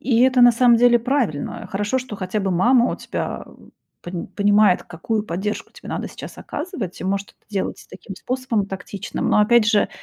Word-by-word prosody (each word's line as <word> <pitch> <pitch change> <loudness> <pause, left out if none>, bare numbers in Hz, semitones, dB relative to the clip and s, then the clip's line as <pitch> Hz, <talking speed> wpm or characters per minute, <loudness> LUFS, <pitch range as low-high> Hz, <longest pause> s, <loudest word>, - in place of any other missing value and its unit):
И 240 -2 +2
это 255 -1 +4
на 245 0 +8
самом 240 0 +5
деле 240 0 +5
правильно. 235 - -2
Хорошо, 205 +6 -1
что 250 -5 -7
хотя 190 +3 -3
бы 195 - -1
мама 235 +7 +3
у - - -4
тебя - - -5 0.6
пон 175 -1 -5
понимает, 205 -2 +3
какую 210 +6 -3
поддержку 195 +4 -4
тебе - - -13
надо - - -4
сейчас - - -10
оказывать. 290 - -6
И - - -5
может 200 +1 -1
это - - -34
делать 200 -2 -4
таким 195 - -10
способом 245 -5 -2
тактичным, 195 0 -5
но 210 - +4
опять 220 +1 +4
же, 215 -2 +3
210 Hz, 185 wpm, -21 LUFS, 195-245 Hz, 0.6 s, на